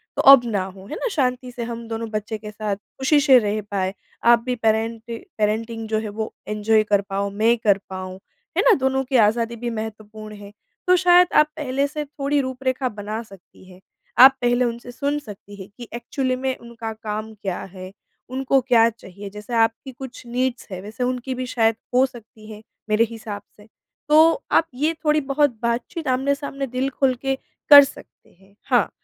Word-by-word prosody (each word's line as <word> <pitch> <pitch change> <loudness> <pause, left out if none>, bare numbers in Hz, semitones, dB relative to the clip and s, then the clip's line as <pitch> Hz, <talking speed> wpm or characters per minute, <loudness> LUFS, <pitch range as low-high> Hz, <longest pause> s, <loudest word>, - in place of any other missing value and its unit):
तो - - +1
अब 275 - +9
ना 205 -5 -1
हो। 190 0 -11
है 305 - -6
ना? - - -2
शांति 250 -5 -1
से 240 -1 -5
हम 230 0 -6
दोनों 225 0 -4
बच्चे 215 0 -3
के 210 0 -9
साथ 210 -1 -3
ख़ुशी 265 +8 0
से 270 -3 +7
रह 210 -1 -1
पाए, 190 -1 -1 0.3
आप 235 0 +6
भी 250 - -1
पैरेंटि 225 +1 -1 0.2
पैरेंटिंग 220 +1 -1
जो 220 - +1
है 215 -1 -5
वो 220 +1 -5
एन्जॉय 215 +1 +2
कर 205 -1 +2
पाओ, 200 +1 -1
मैं 220 +4 +2
कर 205 -3 +3
पाऊँ, 185 0 -6 0.4
है - - +5
ना? - - +6
दोनों 265 0 0
की 260 0 -3
आज़ादी 230 +1 +2
भी 240 +1 -4
महत्वपूर्ण 215 -1 -7
है, 205 0 -11 0.4
तो 365 - +6
शायद 360 0 +5
आप 300 - +5
पहले 275 -1 -1
से 300 +1 -5
थोड़ी 285 0 -1
रूपरेखा 260 0 -2
बना 215 +1 -5
सकती 195 -4 -18
हैं। 180 - -15 0.4
आप 265 0 +9
पहले 245 0 +2
उनसे 240 +1 -5
सुन 285 +4 -2
सकती 205 -5 -12
हैं 190 - -10
कि 240 - -9
एक्चुअली 255 +2 -2
में 260 0 -2
उनका 235 -1 -7
काम 215 0 -5
क्या 190 -3 -3
है? 185 -1 -9 0.4
उनको 265 +1 +1
क्या 235 -3 +4
चाहिए? 200 -2 -11
जैसे 210 +4 -9
आपकी 225 +3 +1
कुछ 260 0 -10
नीड्स 250 +1 -2
हैं, 185 - -5
वैसे 215 +5 -5
उनकी 250 +1 -2
भी 255 0 -4
शायद 225 -2 +3 0.2
हो 260 - +6
सकती 225 -3 -13
हैं, 210 - -10 0.3
मेरे 215 +2 +4
हिसाब 215 -3 -7 0.2
से। 210 - -17 0.4
तो 320 +7 +5
आप 325 - +4
ये 300 +5 +1
थोड़ी-बहुत 290 -4 +2
बातचीत 245 +7 -2
आमने-सामने 275 +1 -1
दिल 255 +2 -2
खोल 265 -1 +1
के 270 -1 0 0.4
कर 285 -1 +12
सकते 275 - -11
हैं। 195 +1 -24
हाँ, - - +3
235 Hz, 190 wpm, -22 LUFS, 215-265 Hz, 0.4 s, कर